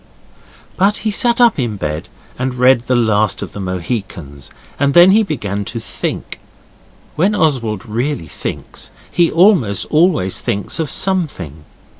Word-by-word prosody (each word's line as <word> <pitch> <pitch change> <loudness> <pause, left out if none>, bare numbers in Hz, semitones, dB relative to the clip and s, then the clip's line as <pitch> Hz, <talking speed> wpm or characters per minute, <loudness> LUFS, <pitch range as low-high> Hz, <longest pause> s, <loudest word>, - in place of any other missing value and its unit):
But 200 +3 +2
he 215 - +1
sat 235 +3 +1
up 235 -8 +4
in 120 -4 -1
bed 75 -2 -4 0.3
and 130 0 -2
read 125 0 +4
The 130 - +2
Last 110 -3 +1
of - - -8
the - - -8
Mohicans, 90 - -5 0.3
and 140 0 +1
then 175 +2 +8
he 215 +3 +5
began 105 - -3
to 115 - -3
think. - - -5 0.8
When 190 +7 +2
Oswald 125 - 0
really 120 - -2
thinks - - -7 0.2
he 170 -1 +2
almost 165 - +3
always 155 - +2
thinks 100 +9 -2
of 160 -3 -1
something. 115 - -2
125 Hz, 145 wpm, -16 LUFS, -, 0.8 s, then